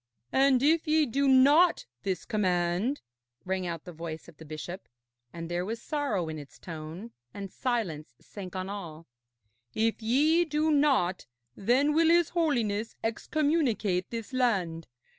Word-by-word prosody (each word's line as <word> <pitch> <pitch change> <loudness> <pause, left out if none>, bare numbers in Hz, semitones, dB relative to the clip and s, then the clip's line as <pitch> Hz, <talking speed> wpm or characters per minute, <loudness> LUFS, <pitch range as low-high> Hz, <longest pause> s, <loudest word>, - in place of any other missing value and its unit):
'And 265 -1 +4
if 320 +3 +3
ye 310 0 +4
do 275 +2 0
not 285 +7 +5 0.2
this 190 -2 -3
command,' 185 +4 0 0.4
rang 185 -1 -1
out 165 -2 -5
the 180 - -8
voice 160 0 -7
of 150 - -15
the 160 - -12
bishop 155 +5 -7 0.4
(and 165 -1 -6
there 175 +1 -2
was 225 +4 -4
sorrow 270 - -2
in 155 -1 -5
its 145 -2 -12
tone, 165 +6 -8 0.2
and 200 -2 -6
silence 200 - -3
sank 190 -2 -9
on 185 0 -3
all), 170 -5 -7 0.7
'if 225 +1 +1
ye 295 +9 +3
do 310 -1 0
not, 275 -12 +2 0.3
then 260 +8 +2
will 325 +1 +4
his 340 -1 +4
Holiness 235 -11 0
excommunicate 230 - 0
this 230 +2 -6
land. 190 -10 0
220 Hz, 145 wpm, -29 LUFS, 175-280 Hz, 0.7 s, not